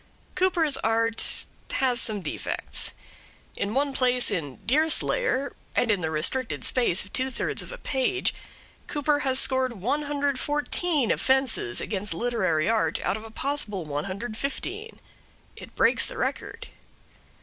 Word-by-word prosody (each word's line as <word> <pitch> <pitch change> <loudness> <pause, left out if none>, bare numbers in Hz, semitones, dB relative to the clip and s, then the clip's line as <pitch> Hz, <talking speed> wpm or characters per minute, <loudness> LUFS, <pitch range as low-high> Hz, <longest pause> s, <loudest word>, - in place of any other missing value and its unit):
Cooper's 340 -6 +3
art 225 0 +2 0.3
has 250 -3 +3
some 215 -3 +1
defects. - - -2 0.6
In 205 +3 -2
one 280 0 +2
place 250 -1 +2
in 150 -9 -3
'Deerslayer,' 305 - +2 0.2
and 230 - +3
in 200 -3 +1
the 160 - -1
restricted 195 +11 0
space 235 -8 +2
of 200 - -16
two 260 +1 +1
thirds 255 - -2
of - - -7
a - - -7
page, 285 - 0 0.5
Cooper 290 0 +1
has 265 -2 +1
scored 260 -2 +2
114 290 - 0
offences 265 - +1
against 205 -4 -2
literary 185 -8 +1
art 225 0 +1
out - - +1
of 215 - -7
a 225 - -9
possible 220 - -2
115. 240 - -4 0.6
It - - -12
breaks - - +3
the - - -8
record. - - -3
255 Hz, 130 wpm, -26 LUFS, 210-285 Hz, 0.6 s, Cooper's